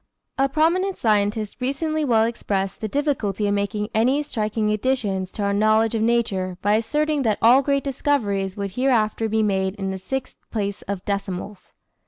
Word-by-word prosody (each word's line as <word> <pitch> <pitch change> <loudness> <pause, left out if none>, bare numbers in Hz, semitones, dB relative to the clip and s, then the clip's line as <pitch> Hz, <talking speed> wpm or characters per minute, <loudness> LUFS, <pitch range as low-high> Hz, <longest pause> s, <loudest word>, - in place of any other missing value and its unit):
A 270 0 +3
prominent 350 +6 +1
scientist 210 -1 0
recently 310 +4 -1
well 230 -6 +3
expressed 195 -4 -2
the 215 - -1
difficulty 220 -6 -1
of 205 - +1
making 205 +1 -1
any 255 +7 +2
striking 215 -5 -1
additions 210 -5 -1
to 205 - -3
our 200 0 +1
knowledge 215 +2 +3
of 225 - 0
nature 205 -6 0
by 205 +1 +3
asserting 300 +7 +1
that 220 -5 +1
all 245 +4 +6
great 280 0 0
discoveries 215 -9 -1
would 200 -1 -3
hereafter 225 -2 +1
be 220 0 +1
made 190 -2 0
in 195 -2 -3
the 190 - -5
sixth 265 +8 -5
place 205 -2 -3
of 200 -2 -4
decimals. 200 0 -4
215 Hz, 170 wpm, -23 LUFS, 200-265 Hz, -, all